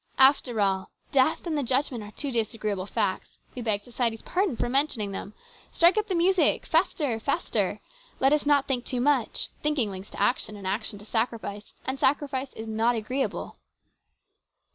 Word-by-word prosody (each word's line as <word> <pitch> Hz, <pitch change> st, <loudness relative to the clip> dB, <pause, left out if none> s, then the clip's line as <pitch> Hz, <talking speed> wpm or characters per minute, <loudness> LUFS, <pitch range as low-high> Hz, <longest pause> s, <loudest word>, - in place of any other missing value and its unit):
After 265 Hz, -4 st, +5 dB
all, 190 Hz, -2 st, +1 dB, 0.2 s
death 275 Hz, +6 st, +3 dB
and 330 Hz, -2 st, -1 dB
the 290 Hz, -, +1 dB
judgment 255 Hz, -2 st, 0 dB
are 205 Hz, -, -9 dB
two 280 Hz, +6 st, -4 dB
disagreeable 215 Hz, -4 st, -1 dB
facts. 190 Hz, -2 st, -2 dB, 0.2 s
We 250 Hz, -, -5 dB
beg 210 Hz, -3 st, 0 dB
society's 235 Hz, -1 st, -2 dB
pardon 365 Hz, -, 0 dB
for -, -, 0 dB
mentioning 250 Hz, -6 st, +1 dB
them. 200 Hz, +1 st, -6 dB, 0.4 s
Strike 340 Hz, +3 st, +5 dB
up 430 Hz, 0 st, 0 dB
the 375 Hz, -, -1 dB
music 360 Hz, +2 st, +3 dB
faster! 260 Hz, -8 st, +1 dB
faster! 280 Hz, +8 st, -1 dB, 0.4 s
Let 270 Hz, +2 st, +4 dB
us 300 Hz, -1 st, +1 dB
not 285 Hz, -2 st, +4 dB
think 255 Hz, -3 st, 0 dB
too 250 Hz, -1 st, -2 dB
much. 265 Hz, -2 st, +1 dB
Thinking 290 Hz, -8 st, +1 dB
leads 190 Hz, +1 st, -8 dB
to -, -, -9 dB
action, 220 Hz, -4 st, +1 dB
and 200 Hz, -2 st, -9 dB
action 205 Hz, +2 st, -2 dB
leads 205 Hz, +2 st, -14 dB
to -, -, -19 dB
sacrifice, 220 Hz, -3 st, -2 dB
and 265 Hz, +1 st, -2 dB
sacrifice 275 Hz, -1 st, 0 dB
is 220 Hz, -, -7 dB
not 225 Hz, +2 st, +1 dB
agreeable. 255 Hz, +5 st, -3 dB
245 Hz, 175 wpm, -27 LUFS, 215-285 Hz, 0.4 s, After